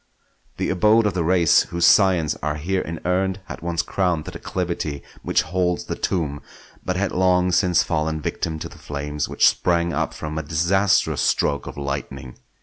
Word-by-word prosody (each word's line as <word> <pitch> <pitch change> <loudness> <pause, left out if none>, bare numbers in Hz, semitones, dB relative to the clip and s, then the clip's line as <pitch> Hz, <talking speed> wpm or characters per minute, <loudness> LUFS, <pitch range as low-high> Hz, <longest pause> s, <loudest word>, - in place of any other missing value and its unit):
The - - -1
abode 105 +4 +4
of 105 - +1
the 90 -1 -1
race 85 -1 +4
whose 85 0 0
scions 90 -4 +4
are 75 0 -2
here 90 +5 -1
inurned 90 +3 -2
had 85 - -8
once 85 0 -1
crowned 90 -5 -1
the - - -6
declivity 85 -5 -4 0.2
which - - +1
holds 90 +1 -1
the - - -4
tomb, 75 -6 -2 0.4
but 90 - -2
had 100 +2 -1
long 90 0 +2
since 90 0 +3
fallen 80 -1 -1
victim 80 +1 -3
to - - -6
the - - -15
flames 75 0 -4
which - - +4
sprang 85 -1 +1
up 80 +2 -2
from 75 0 -4
a - - -2
disastrous 85 +6 +1
stroke 70 - 0
of - - -8
lightning. 70 -2 -5
85 Hz, 175 wpm, -22 LUFS, 75-90 Hz, 0.4 s, abode